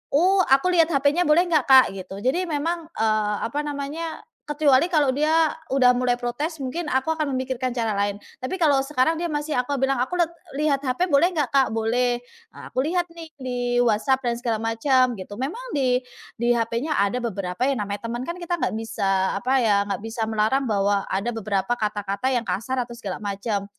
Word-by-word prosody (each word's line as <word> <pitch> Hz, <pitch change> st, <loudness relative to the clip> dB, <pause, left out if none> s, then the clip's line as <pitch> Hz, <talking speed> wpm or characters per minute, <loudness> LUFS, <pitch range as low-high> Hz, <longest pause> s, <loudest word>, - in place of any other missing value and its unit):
"Oh, 375 Hz, +5 st, +4 dB
aku 270 Hz, +7 st, +4 dB
lihat 330 Hz, -2 st, +4 dB
HP-nya 285 Hz, +5 st, +2 dB
boleh 320 Hz, +4 st, +5 dB
nggak, 305 Hz, -5 st, +3 dB
Kak?" 265 Hz, -1 st, +9 dB
Gitu. 190 Hz, 0 st, -8 dB
Jadi 350 Hz, +9 st, +1 dB
memang, 325 Hz, +2 st, -2 dB
eee, 215 Hz, -1 st, +1 dB
apa 260 Hz, +6 st, -3 dB
namanya, 295 Hz, +3 st, -5 dB, 0.2 s
kecuali 295 Hz, -1 st, +3 dB
kalau 295 Hz, -3 st, +4 dB
dia 310 Hz, +2 st, +2 dB, 0.2 s
udah 250 Hz, -2 st, +5 dB
mulai 250 Hz, -1 st, +1 dB
protes, 290 Hz, +6 st, -3 dB
mungkin 310 Hz, +6 st, -3 dB
aku 265 Hz, +3 st, 0 dB
akan 305 Hz, -3 st, -2 dB
memikirkan 255 Hz, -1 st, -2 dB
cara 230 Hz, -3 st, -1 dB
lain. 200 Hz, 0 st, -1 dB, 0.2 s
Tapi 255 Hz, +9 st, -3 dB
kalau 295 Hz, -4 st, +4 dB
sekarang 300 Hz, +3 st, +1 dB
dia 345 Hz, -, -2 dB
masih 295 Hz, -1 st, -2 dB
aku 250 Hz, +3 st, -1 dB
bilang, 270 Hz, 0 st, +2 dB
"Aku 260 Hz, -, -2 dB
let 335 Hz, -, +2 dB, 0.3 s
lihat 290 Hz, -2 st, +1 dB
HP 265 Hz, +9 st, 0 dB
boleh 290 Hz, +4 st, +4 dB
nggak, 295 Hz, -7 st, 0 dB
Kak?" 270 Hz, -1 st, +4 dB
"Boleh," 240 Hz, +2 st, 0 dB
eee, 460 Hz, -, -17 dB
aku 260 Hz, -, 0 dB
lihat 350 Hz, +2 st, 0 dB
nih 330 Hz, -1 st, -10 dB
di 245 Hz, -1 st, 0 dB
WhatsApp 245 Hz, +4 st, +2 dB
dan 240 Hz, -1 st, +1 dB
segala 235 Hz, -2 st, -1 dB
macem, 245 Hz, +2 st, +2 dB
gitu. 190 Hz, +2 st, -8 dB
Memang 285 Hz, -, -4 dB
di 255 Hz, -3 st, +2 dB, 0.4 s
di 240 Hz, +1 st, +2 dB
HP-nya 235 Hz, +6 st, -1 dB
ada 200 Hz, +4 st, +1 dB
beberapa 195 Hz, -2 st, -3 dB
yang 265 Hz, -6 st, -1 dB
namanya 205 Hz, +3 st, -5 dB
teman, 240 Hz, +1 st, -4 dB
kan 340 Hz, +6 st, -5 dB
kita 345 Hz, 0 st, -2 dB
nggak -, -, 0 dB
bisa 195 Hz, -4 st, 0 dB
apa 250 Hz, +5 st, -1 dB
ya, 205 Hz, -3 st, +3 dB
nggak 200 Hz, -, -3 dB
bisa 225 Hz, +1 st, -5 dB
melarang 220 Hz, +5 st, +1 dB
bahwa 200 Hz, -1 st, +2 dB
ada 195 Hz, +5 st, -1 dB
beberapa 205 Hz, -1 st, -1 dB
kata-kata 210 Hz, +2 st, -2 dB
yang 240 Hz, -2 st, 0 dB
kasar 215 Hz, +8 st, -2 dB
atau 240 Hz, 0 st, -6 dB
segala 195 Hz, -6 st, -5 dB
macam. 200 Hz, 0 st, -2 dB
255 Hz, 195 wpm, -23 LUFS, 225-295 Hz, 0.4 s, Kak